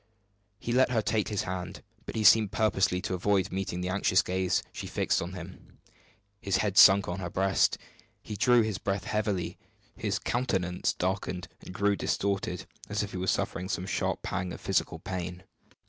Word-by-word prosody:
He 120 Hz, -, -4 dB
let 130 Hz, +2 st, +4 dB
her 115 Hz, -3 st, +1 dB
take 110 Hz, -2 st, 0 dB
his 105 Hz, -2 st, -1 dB
hand, 90 Hz, 0 st, -5 dB, 0.2 s
but -, -, -6 dB
he 110 Hz, -, 0 dB
seemed 105 Hz, -1 st, +6 dB
purposely 105 Hz, -4 st, +1 dB
to -, -, -3 dB
avoid 95 Hz, +1 st, +1 dB
meeting 95 Hz, -1 st, -3 dB
the 90 Hz, -, -2 dB
anxious 95 Hz, 0 st, +3 dB
gaze 95 Hz, 0 st, 0 dB
she -, -, -6 dB
fixed -, -, 0 dB
on 85 Hz, +2 st, -5 dB
him. 90 Hz, 0 st, -11 dB, 0.6 s
His 100 Hz, -, +1 dB
head 100 Hz, -3 st, 0 dB
sunk 100 Hz, -1 st, +8 dB
on 90 Hz, +2 st, -3 dB
his 90 Hz, -2 st, -4 dB
breast; 95 Hz, +2 st, +2 dB, 0.5 s
he 105 Hz, -, -6 dB
drew 120 Hz, +2 st, +4 dB
his 110 Hz, -3 st, -2 dB
breath 95 Hz, -1 st, -2 dB
heavily, 105 Hz, -5 st, -2 dB, 0.4 s
his -, -, -1 dB
countenance 95 Hz, -8 st, -1 dB
darkened 90 Hz, -2 st, -2 dB, 0.2 s
and -, -, -9 dB
grew 100 Hz, +2 st, +1 dB
distorted, 95 Hz, -3 st, -1 dB, 0.2 s
as 105 Hz, 0 st, -1 dB
if 100 Hz, -, -5 dB
he -, -, -5 dB
were 90 Hz, +1 st, -3 dB
suffering 90 Hz, 0 st, -1 dB
some 90 Hz, -2 st, -2 dB
sharp 95 Hz, -, -2 dB
pang 90 Hz, 0 st, -3 dB
of -, -, -7 dB
physical -, -, 0 dB
pain. 90 Hz, -1 st, -5 dB
95 Hz, 180 wpm, -29 LUFS, 90-105 Hz, 0.6 s, sunk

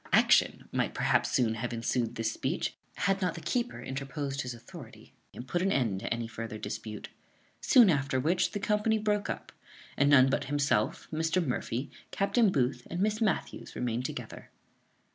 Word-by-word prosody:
Action -, -, +4 dB
might -, -, -1 dB
perhaps -, -, +2 dB
soon 115 Hz, -3 st, +2 dB
have 120 Hz, +2 st, -3 dB
ensued 115 Hz, 0 st, -1 dB
this 115 Hz, 0 st, -1 dB
speech, -, -, -2 dB, 0.2 s
had 195 Hz, +1 st, 0 dB
not 180 Hz, -3 st, 0 dB
the -, -, -6 dB
keeper 245 Hz, +4 st, -1 dB
interposed 135 Hz, +1 st, -4 dB
his 125 Hz, -1 st, -5 dB
authority, 115 Hz, 0 st, -13 dB, 0.2 s
and 125 Hz, -, -9 dB
put 175 Hz, +7 st, 0 dB
an 195 Hz, +1 st, +1 dB
end 115 Hz, -, +1 dB
to -, -, -5 dB
any 115 Hz, 0 st, -1 dB
further 115 Hz, -1 st, -6 dB
dispute. 105 Hz, 0 st, -6 dB, 0.5 s
Soon 245 Hz, -4 st, +7 dB
after 140 Hz, -5 st, +1 dB
which, 165 Hz, +7 st, +2 dB
the 205 Hz, -, -2 dB
company 210 Hz, +2 st, +1 dB
broke 210 Hz, -1 st, 0 dB
up, -, -, -5 dB, 0.4 s
and 140 Hz, 0 st, +3 dB
none 135 Hz, -2 st, +7 dB
but 135 Hz, -, 0 dB
himself, 140 Hz, -6 st, 0 dB
Mr. 165 Hz, +3 st, +1 dB
Murphy, 125 Hz, +1 st, -3 dB, 0.2 s
Captain 200 Hz, +1 st, +2 dB
Booth, 125 Hz, -4 st, 0 dB
and 175 Hz, -, -4 dB
Miss 215 Hz, +3 st, +1 dB
Matthews, 215 Hz, -6 st, -1 dB
remained 120 Hz, 0 st, -2 dB
together. -, -, -7 dB
140 Hz, 170 wpm, -30 LUFS, 120-190 Hz, 0.5 s, Soon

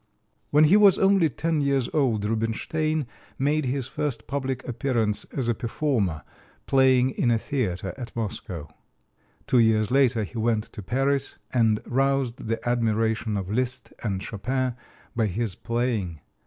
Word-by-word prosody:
When 150 Hz, +1 st, +5 dB
he 165 Hz, +7 st, +6 dB
was 205 Hz, -3 st, +6 dB
only 195 Hz, -4 st, +4 dB
ten 160 Hz, +3 st, -1 dB
years 140 Hz, -3 st, +1 dB
old 120 Hz, -9 st, +1 dB
Rubinstein 135 Hz, +8 st, -1 dB, 0.3 s
made 145 Hz, +2 st, +1 dB
his 130 Hz, 0 st, -1 dB
first 140 Hz, -6 st, -3 dB
public 130 Hz, -1 st, -3 dB
appearance 115 Hz, -4 st, -1 dB
as 130 Hz, -4 st, -4 dB
a 120 Hz, -, +3 dB
performer, 115 Hz, -, -1 dB, 0.4 s
playing 130 Hz, -1 st, +4 dB
in 125 Hz, -, 0 dB
a 115 Hz, -, +3 dB
theater 100 Hz, -8 st, -2 dB
at 120 Hz, -, -7 dB
Moscow. 95 Hz, -8 st, -4 dB, 0.8 s
Two 125 Hz, -, +3 dB
years 110 Hz, -2 st, +3 dB
later 130 Hz, -4 st, +3 dB
he 115 Hz, +3 st, -6 dB
went 110 Hz, -1 st, +1 dB
to 110 Hz, -, -9 dB
Paris, 135 Hz, +6 st, 0 dB, 0.2 s
and 110 Hz, -4 st, +3 dB
roused 135 Hz, -2 st, 0 dB
the 115 Hz, +1 st, -2 dB
admiration 110 Hz, -2 st, +1 dB
of 95 Hz, 0 st, -4 dB
Liszt 125 Hz, +3 st, -2 dB
and 95 Hz, -4 st, -2 dB
Chopin 130 Hz, +4 st, -2 dB, 0.4 s
by 115 Hz, -2 st, +2 dB
his 105 Hz, +1 st, -2 dB
playing. 115 Hz, -, -2 dB
120 Hz, 145 wpm, -25 LUFS, 110-135 Hz, 0.8 s, he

